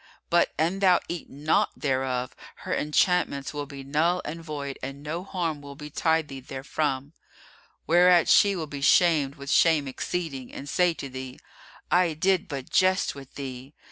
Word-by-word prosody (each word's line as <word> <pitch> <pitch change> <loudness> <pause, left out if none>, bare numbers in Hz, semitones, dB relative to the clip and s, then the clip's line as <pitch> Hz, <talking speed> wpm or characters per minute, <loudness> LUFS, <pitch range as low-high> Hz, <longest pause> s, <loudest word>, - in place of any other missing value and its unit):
But, 170 0 +3
an 170 +5 0
thou 185 -3 +5
eat 175 -2 -6
not 150 +3 +1
thereof, 130 -3 -1 0.3
her - - -1
enchantments 150 -2 +1
will 145 -1 -4
be 140 -1 -9
null 160 +6 +1
and 165 +2 -6
void 145 -3 -5
and 135 +2 -7
no 165 +4 -4
harm 170 -6 -3
will 140 -1 -10
betide 160 +2 0
thee 135 -1 -8
therefrom; 135 +1 -3 0.7
whereat 175 +1 +5
she 200 -1 +5
will 165 -3 -3
be 145 -2 -7
shamed 150 -2 +4
with 140 0 -6
shame 160 -4 +4
exceeding 135 -1 -4
and 140 - -8
say 175 +1 +2
to 140 - -6
thee, 130 -1 -8 0.5
'I 175 -1 +3
did 190 +3 +1
but 140 -4 -6
jest 185 0 +3
with 135 -2 -12
thee! 135 0 -7
150 Hz, 165 wpm, -26 LUFS, 140-170 Hz, 0.7 s, thou